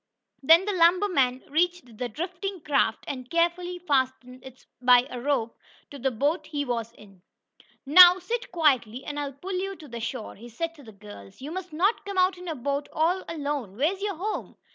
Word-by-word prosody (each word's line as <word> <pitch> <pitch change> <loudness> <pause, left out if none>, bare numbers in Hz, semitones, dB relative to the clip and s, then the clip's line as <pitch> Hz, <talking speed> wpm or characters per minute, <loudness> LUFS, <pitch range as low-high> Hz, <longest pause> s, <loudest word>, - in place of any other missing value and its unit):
Then 325 +6 +6
the 415 - -1
lumber 360 +3 +4
man 260 -8 +1
reached 325 -7 -1
the 245 - -2
drifting 365 - -5
craft, 275 -7 +1
and 255 -3 -6
carefully 345 +1 0
fastened 260 -6 -1
it 260 -1 -14 0.2
by 250 0 +6
a 250 -1 -6
rope 245 -4 -1 0.4
to 285 - -9
the 265 +2 +1
boat 290 +6 -1
he 290 -1 -3
was 230 -3 -3
in. 195 -5 -18 0.6
"Now 355 +5 +9
sit 460 +7 -4
quietly 265 -8 +1
and 290 0 -4
I'll 285 -1 -4
pull 360 +9 -7
you 390 +1 -4
to 285 -9 -9
shore," 230 0 -5
he 235 +4 -12
said 330 +8 -4
to 295 -4 -16
the 225 - -12
girls. 200 - -13
"You 285 +4 -7
must 370 0 -6
not 370 +8 +1
come 400 -1 -6
out 370 0 +2
in 360 - -10
a 325 - -3
boat 280 +2 -3
all 345 +4 +1
alone. 285 - -4
Where 305 +8 +2
is 390 - -11
your 405 -2 -2
home?" 405 +6 -4
290 Hz, 200 wpm, -26 LUFS, 250-355 Hz, 0.6 s, Now